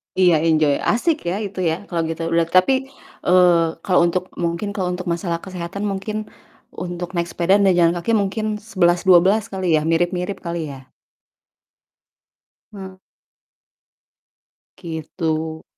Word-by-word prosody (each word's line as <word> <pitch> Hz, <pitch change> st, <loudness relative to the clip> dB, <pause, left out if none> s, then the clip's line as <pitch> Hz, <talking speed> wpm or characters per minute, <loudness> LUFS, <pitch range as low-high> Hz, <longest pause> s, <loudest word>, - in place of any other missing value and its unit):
Iya, 180 Hz, -3 st, +4 dB
enjoy, 155 Hz, -3 st, +3 dB, 0.2 s
asik, 315 Hz, +8 st, +1 dB
ya 180 Hz, -, -1 dB
itu, 195 Hz, -1 st, -7 dB
ya, 160 Hz, -, 0 dB
kalo 170 Hz, -, -2 dB
gitu. 165 Hz, +1 st, -4 dB
Berart 165 Hz, 0 st, +1 dB
tapi, 185 Hz, +9 st, +4 dB, 0.5 s
eee, 175 Hz, -2 st, +5 dB, 0.2 s
kalo 185 Hz, -, +2 dB
untuk 180 Hz, +1 st, -1 dB, 0.2 s
mungkin 170 Hz, +5 st, -2 dB
kalo 185 Hz, -3 st, -1 dB
untuk 180 Hz, 0 st, -6 dB
masalah 170 Hz, -1 st, -3 dB
kesehatan 185 Hz, +1 st, -6 dB
mungkin 205 Hz, +2 st, -4 dB, 0.6 s
untuk 175 Hz, -1 st, -5 dB
naik 170 Hz, 0 st, 0 dB
sepeda 175 Hz, +3 st, +2 dB
dan 195 Hz, -2 st, +4 dB
jalan 170 Hz, -1 st, +4 dB
kaki 175 Hz, +6 st, -2 dB
mungkin 210 Hz, +2 st, -2 dB, 0.2 s
sebelas 180 Hz, -5 st, +2 dB
dua 180 Hz, -2 st, +8 dB
belas 210 Hz, +3 st, +3 dB
kali 185 Hz, -4 st, +1 dB
ya 155 Hz, -, 0 dB
mirip-mirip 175 Hz, +3 st, 0 dB
kali, 170 Hz, 0 st, -3 dB
ya? 130 Hz, -1 st, -13 dB, 1.8 s
Hmm. 190 Hz, -2 st, -10 dB, 1.8 s
Gitu. 160 Hz, -2 st, -4 dB
175 Hz, 135 wpm, -20 LUFS, 170-190 Hz, 1.8 s, dua